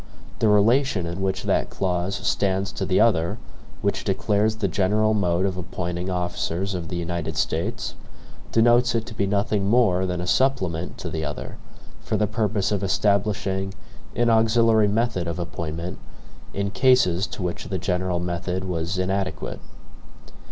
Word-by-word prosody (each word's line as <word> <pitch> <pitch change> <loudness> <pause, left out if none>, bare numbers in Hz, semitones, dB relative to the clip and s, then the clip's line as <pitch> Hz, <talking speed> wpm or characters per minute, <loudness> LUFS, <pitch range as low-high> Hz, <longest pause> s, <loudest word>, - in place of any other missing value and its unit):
The 110 - +3
relation 105 -1 +3
in 85 +3 -4
which 95 0 -1
that - - +1
clause 90 0 -1
stands 95 -1 0
to - - -3
the 95 - +3
other, 90 -7 +3 0.5
which - - 0
declares 105 +1 +1
the 110 -2 -1
general 105 +4 +2
mode 90 -3 +1
of 95 -2 -1
appointing 90 +1 -4
officers 90 +1 -2
of 85 -3 -4
the - - -4
United 85 -1 -3
States, - - -1 0.6
denotes 120 +1 +4
it 115 -1 0
to 110 - -8
be 100 -2 0
nothing 100 0 0
more 100 -6 +3
than 90 -1 -2
a 90 - -3
supplement 90 -6 0
to - - -5
the 80 - -3
other, 75 -1 -5 0.4
for - - -2
the 105 - +2
purpose 105 -2 0
of 100 -2 0
establishing 100 -1 0 0.4
an 120 -1 +3
auxiliary 110 -1 +4
method 105 -4 0
of 85 - -3
appointment, 85 +1 -5 0.5
in 100 0 -2
cases 100 -5 +3
to 95 - -6
which 90 -1 -3
the 95 - -2
general 90 0 -1
method 90 +1 -2
was 90 0 -2
inadequate. 95 -3 -2
95 Hz, 155 wpm, -24 LUFS, 90-110 Hz, 0.6 s, denotes